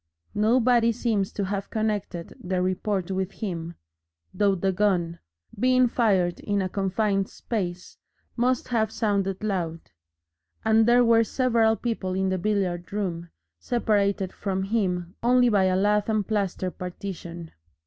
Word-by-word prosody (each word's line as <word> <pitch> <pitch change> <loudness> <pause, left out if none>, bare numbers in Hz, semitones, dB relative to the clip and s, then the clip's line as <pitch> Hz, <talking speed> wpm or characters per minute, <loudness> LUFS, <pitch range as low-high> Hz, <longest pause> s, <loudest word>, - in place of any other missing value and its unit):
Nobody 235 +2 +3
seems 215 -4 -1
to 200 - -2
have 200 +1 -3
connected 205 -6 -3
the 185 0 -1
report 185 0 -1
with 190 0 -2
him, 170 -5 -5 0.6
though 200 -2 +2
the 190 +1 0
gun, 180 -4 0 0.4
being 255 +1 +4
fired 195 -8 +1
in 205 -1 -1
a 190 - 0
confined 195 +1 0
space, 180 -6 -5 0.4
must 250 +1 0
have 220 -3 +1
sounded 200 -3 -1
loud, 170 -6 -3 0.7
and 220 0 +4
there 245 +1 +5
were 230 0 +5
several 230 -2 +2
people 220 -6 -3
in 190 0 0
the 185 0 -1
billiard 185 -3 -1
room, 175 -5 -3 0.3
separated 200 -5 0
from 190 -2 -2
him 185 -4 -1
only 245 +1 +4
by 200 -4 +3
a 185 0 +2
lath 205 +2 +2
and 215 -3 0
plaster 195 -3 -1
partition. 175 -2 -7
200 Hz, 140 wpm, -25 LUFS, 185-220 Hz, 0.7 s, there